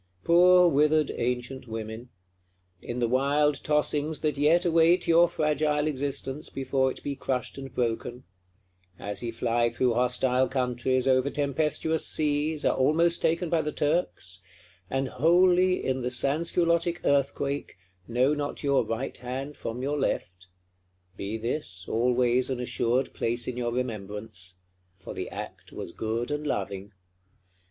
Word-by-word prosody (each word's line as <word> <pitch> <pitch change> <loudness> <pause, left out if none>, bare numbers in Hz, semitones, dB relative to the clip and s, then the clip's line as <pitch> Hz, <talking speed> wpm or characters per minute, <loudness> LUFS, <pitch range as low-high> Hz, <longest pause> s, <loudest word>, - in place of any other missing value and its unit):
Poor 180 +1 +6
withered 150 -1 +3
ancient 125 +2 -3
women! 110 +2 -6 0.7
in 120 - -5
the 120 -1 +1
wild 140 +4 +2
tossings 150 0 0
that 155 -1 0
yet 155 +5 +3
await 170 +1 +4
your 170 +1 +5
fragile 150 -1 0
existence, 140 -1 -3
before 130 0 0
it - - -8
be 140 - -3
crushed 130 -2 -3
and 135 -1 -8
broken; 120 +1 -2 0.7
as 100 +1 -5
ye 120 - -3
fly 120 0 0
through 120 +1 +1
hostile 125 +1 +1
countries, 130 0 0
over 130 +1 +3
tempestuous 150 +3 0
seas, 150 0 0
are - - +3
almost 165 +6 +2
taken 170 +2 +1
by 165 0 +1
the 150 0 -3
Turks; 145 - -1 0.5
and 135 0 -1
wholly, 180 +6 +3
in 130 0 0
the 125 - -1
Sansculottic 170 +6 +1
Earthquake, 140 0 0 0.3
know 125 +5 +2
not 145 0 -4
your 140 -3 +3
right 115 +4 -4
hand 130 +4 -5
from 120 +3 -5
your 145 +2 -1
left, 90 -8 -3 0.7
be 105 +3 -4
this 110 -5 -2
always 125 +2 +2
an 130 -2 -2
assured 125 +1 0
place 120 +1 -1
in 125 - -3
your 120 -1 -2
remembrance: 105 -6 -4 0.3
for 95 - -9
the - - -5
act - - -8
was - - -7
good 115 +7 -3
and 150 0 -2
loving! 100 -4 -3
135 Hz, 140 wpm, -27 LUFS, 120-150 Hz, 0.7 s, Poor